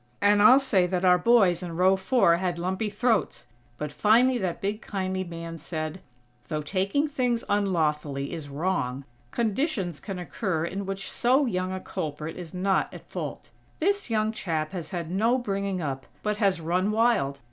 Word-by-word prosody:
And 205 0 +4
I'll 255 +5 +9
say 205 -10 +2
that 180 0 -1
our 180 0 +6
boys, 195 -5 +4
in 175 -2 -5
row 185 +2 +5
four, 190 -3 +3
had 180 -1 -2
lumpy 190 +5 -2
throats. 220 +1 0 0.3
But 150 +2 -4
finally 240 +4 +4
that 185 -4 -2
big 205 +3 -2
kindly 190 -2 -2
man 165 -1 -7
said: 155 +2 -5 0.5
"Though 155 -1 -3
taking 195 - 0
things 250 -5 0
unlawfully 150 -8 0
is 155 -4 -6
wrong, 140 -4 -1 0.3
conditions 220 - -1
can 195 -3 -6
occur 180 -2 -2
in 195 +3 -4
which 195 0 -4
so 260 +4 +3
young 185 -5 -1
a 185 - -3
culprit 155 -4 -5
is 175 -3 -8
not 190 +1 0
at - - -12
fault. - - -6 0.3
This 400 0 +1
young 215 -1 +1
chap 160 -7 -2
has 180 -4 -5
had 170 -3 -4
no 225 +7 +2
bringing 200 -6 -2
up, 135 -2 -4 0.2
but 210 0 0
has 195 -4 +2
run 180 +5 0
wild. 215 - +2
190 Hz, 170 wpm, -26 LUFS, 170-215 Hz, 0.5 s, I'll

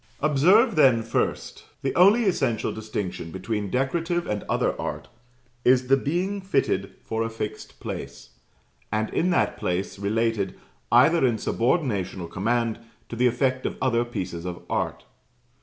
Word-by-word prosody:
Observe, 175 - +4
then, 130 -7 +5
first 115 - -2 0.2
the 135 - 0
only 200 +7 +6
essential 145 - 0
distinction 105 -6 -5
between 105 +3 -3
Decorative 165 - 0
and 105 -1 -2
other - - +1
art - - -5 0.5
is 125 0 +4
the 135 - +7
being 180 +9 -1
fitted 190 +1 0
for 110 0 -3
a 115 - -1
fixed 110 -1 -6
place; - - -7 0.6
and 110 +1 -1
in 180 - +1
that 175 - +1
place, 90 +2 -2
related, 105 -1 0 0.4
either 145 +8 +5
in 120 -4 +3
subordination 115 - 0
or 85 - -5
command, 115 +5 -1 0.3
to - - -5
the 125 +2 +3
effect 130 +1 0
of - - -5
other 120 -3 +2
pieces 95 -8 -5
of 90 -1 -6
art. - - -2
120 Hz, 145 wpm, -25 LUFS, 105-150 Hz, 0.6 s, the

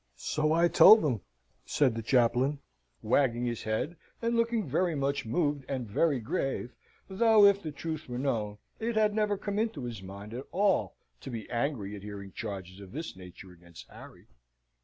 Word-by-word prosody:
"So 155 - -1
I 170 +2 +4
told 215 +4 +8
them," 125 - 0 0.4
says 135 -5 +2
the 115 - -4
chaplain, 125 +4 +2 0.5
wagging 120 0 +2
his 120 -2 -3
head 110 +10 -2 0.2
and 230 0 0
looking 230 -4 +1
very 165 +4 0
much 140 -3 -1
moved 145 +1 0
and 130 -4 -3
very 140 +6 +1
grave, 125 +2 -3 0.3
though, 215 +1 +5
if 200 0 +5
the 155 - -5
truth 155 0 -6
were 120 - -4
known, 110 -6 -2 0.2
it 230 +1 -2
had 215 -1 +3
never 210 -1 +1
come 205 +1 -3
into 220 - -2
his 115 -5 -6
mind 100 +3 -9
at 130 +3 -6
all 190 - +1 0.2
to - - -9
be 115 -4 -6
angry 115 -5 -2
at 100 - -9
hearing 100 -1 -8
charges 95 -3 -7
of 100 -2 -12
this 160 -3 -5
nature 95 0 -12
against 85 -8 -15
Harry. - - -13
135 Hz, 180 wpm, -29 LUFS, 110-175 Hz, 0.5 s, told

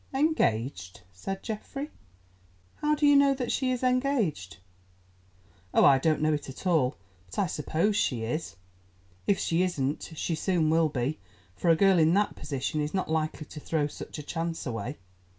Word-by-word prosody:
"Engaged," 115 - 0
said 195 - -5
Geoffrey, 275 +7 -5 0.9
"how 300 0 +1
do 300 0 +1
you 290 0 +6
know 280 -1 +5
that 250 -3 -2
she 260 - 0
is 255 0 -2
engaged?" 250 - 0 1.2
"Oh, - - +6
I 135 -2 +7
don't 155 +2 +1
know 155 0 +3
it 145 -2 -3
at 135 - -10
all, 150 -7 +2 0.3
but 90 - -11
I 200 - +3
suppose 165 +5 0
she 125 - 0
is. 140 +9 -3 0.7
If 200 - +3
she 170 -1 +1
isn't, 155 -3 -1
she 165 - -2
soon 165 -2 +1
will 160 -1 +3
be, 135 +1 -2 0.4
for 175 - 0
a 165 - +7
girl 195 0 +4
in 160 +2 +4
that 205 +1 +1
position 145 +1 -3
is 150 +5 -3
not 185 -4 -1
likely 155 -1 -1
to 150 - -9
throw 150 0 0
such 145 - -7
a 150 - -6
chance 165 +2 -3
away. 125 +3 -4
160 Hz, 175 wpm, -28 LUFS, 145-205 Hz, 1.2 s, I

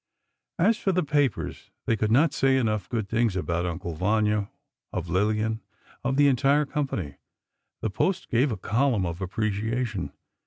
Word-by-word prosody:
As 210 +6 +3
for 195 - +1
the 180 0 +1
papers, 145 -6 -1 0.2
they 115 - +2
could 110 0 0
not 145 +6 +4
say 135 0 +3
enough 110 -6 0
good 110 -4 -2
things 115 -2 +1
of 95 - -2
"Uncle 85 0 -2
Vanya," 105 +3 +1 0.4
of 90 - -4
Lillian, 110 +4 +1 0.4
of 130 +2 0
the 145 0 +6
entire 140 +3 +3
company. 135 - -3 0.6
The 110 - -1
Post 185 - 0
gave 125 +4 +2
a 110 - -2
column 115 +1 +1
of 85 +2 -4
appreciation. 110 +2 -2
110 Hz, 155 wpm, -26 LUFS, 100-135 Hz, 0.6 s, the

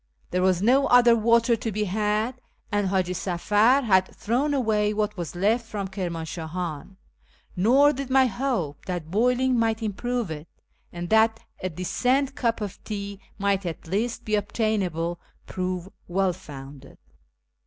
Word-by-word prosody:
There 180 - +1
was 185 0 +2
no 265 +5 +4
other 240 -1 +6
water 230 +1 +3
to 225 0 -4
be 210 +1 -1
had, 215 +5 -1 0.3
and 205 -1 +1
Haji 185 -1 0
Safar 205 +9 +2
had 190 -5 +4
thrown 255 +7 0
away 215 -6 +1
what 210 0 -1
was 175 -3 -5
left 220 +6 +1
from 200 -3 -4
Kirmanshahan; 170 -1 -5 0.6
nor 260 +10 +5
did 275 -1 -5
my 265 0 +5
hope 235 - -2
that 175 -3 -4
boiling 250 +4 +2
might 225 0 0
improve 230 -1 -2
it, 155 +1 -7 0.4
and 175 0 -5
that 220 0 +4 0.2
a 185 - -2
decent 250 - 0
cup 230 -4 -1
of 205 -3 -6
tea 200 -2 -5 0.2
might 200 -1 +1
at 170 -3 -5
least 230 +6 -2
be 215 - -3
obtainable, 195 -6 -1 0.3
prove 185 -1 -3 0.2
well 185 +1 +1
founded. 140 -5 -11
210 Hz, 145 wpm, -25 LUFS, 180-235 Hz, 0.6 s, other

